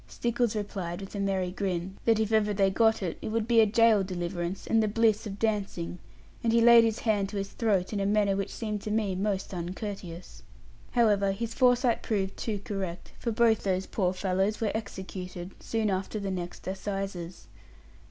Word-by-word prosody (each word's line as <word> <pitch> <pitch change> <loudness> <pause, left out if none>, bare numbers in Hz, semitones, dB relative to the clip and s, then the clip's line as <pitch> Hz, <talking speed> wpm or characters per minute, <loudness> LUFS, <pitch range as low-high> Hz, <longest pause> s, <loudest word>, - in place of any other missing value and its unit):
Stickles 240 -1 -1
replied, 190 -4 -4
with 195 -1 -8
a 205 - -4
merry 190 -2 0
grin, 185 -1 -3
that 225 -2 +4
if 220 0 0
ever 210 -2 +2
they 195 -1 +3
got 220 +1 +3
it, 170 -3 -3
it - - -5
would 220 0 -1
be 235 -1 +5
a 220 - +5
jail 225 -1 +4
deliverance, 175 0 -4
and 225 0 +3
the 215 - +2
bliss 220 0 +2
of 200 -1 -6
dancing; 200 -6 -2 0.4
and 230 - +2
he 230 - +4
laid 235 0 +8
his 225 -1 +1
hand 205 -4 0
to 205 - -5
his 195 0 -3
throat 205 -4 0
in 205 - -1
a 195 - 0
manner 205 -1 +2
which 195 -1 -2
seemed 210 -3 -4
to 215 - -5
me 210 -2 0
most 195 0 -2
uncourteous. 180 0 -6 0.5
However, 205 -5 +3
his 230 +3 -4
foresight 245 -2 +3
proved 195 -3 -1
too 220 -3 -3
correct; 190 -4 -5
for 235 - -1
both 225 -1 +3
those 190 -1 0
poor 185 -4 0
fellows 190 +2 0
were 220 -2 0
executed, 190 -4 -6
soon 220 -2 -1
after 190 +3 -2
the 200 -1 -3
next 175 -1 -5
assizes. 190 -2 -4
200 Hz, 190 wpm, -28 LUFS, 190-220 Hz, 0.5 s, laid